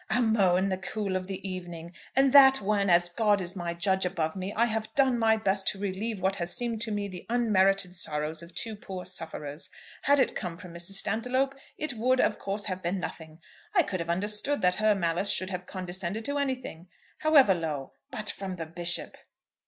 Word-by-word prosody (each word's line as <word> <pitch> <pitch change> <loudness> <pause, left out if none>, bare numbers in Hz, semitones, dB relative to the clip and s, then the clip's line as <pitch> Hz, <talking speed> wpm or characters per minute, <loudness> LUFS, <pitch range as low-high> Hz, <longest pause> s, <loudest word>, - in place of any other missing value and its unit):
"'"Amo" 220 -7 +3
in 190 +2 +2
the 185 -1 -2
cool 195 0 -3
of 185 0 -2
the 195 0 -5
evening!' 175 -2 -7 0.2
And 270 0 +4
that 270 -1 +9
when, 200 -1 +1
as 175 0 +5
God 205 +2 +2
is 185 +1 -4
my 170 -2 -3
judge 190 +2 +1
above 170 -4 -1
me, 190 +1 -4
I 230 +3 +2
have 220 -1 -2
done 265 -3 +3
my 220 -1 +4
best 195 -2 0
to 195 - 0
relieve 200 +2 -3
what 190 +1 0
has 175 0 -2
seemed 235 -3 -2
to 230 -2 -1
me 205 -1 -2
the 180 -3 -8
unmerited 195 -5 +3
sorrows 155 -2 -1
of 170 +1 -13
two 225 -2 -1
poor 190 -3 -7
sufferers! 160 -4 -5 0.3
Had 285 0 +4
it - - +2
come 175 -4 -4
from 180 -1 -11
Mrs. 170 +3 -4
Stantiloup, 250 +7 0 0.2
it 305 -4 -2
would, 250 +3 +1
of 210 - +2
course, 200 +1 -4
have 185 -2 -3
been 180 +2 -1
nothing. 160 -2 -7 0.3
I 355 - +6
could 190 -9 -3
have 170 0 -4
understood 210 +10 0
that 180 0 +3
her 215 -1 +4
malice 175 +1 0
should 185 +1 0
have 180 0 -5
condescended 185 +3 -4
to 285 0 -1
anything, 255 - -3 0.3
however 290 -10 +6
low. 155 -6 -4 0.2
But 215 -1 -6
from 190 -2 -5
the 165 -2 -5
Bishop!" 175 +2 -1
195 Hz, 205 wpm, -28 LUFS, 175-220 Hz, 0.3 s, that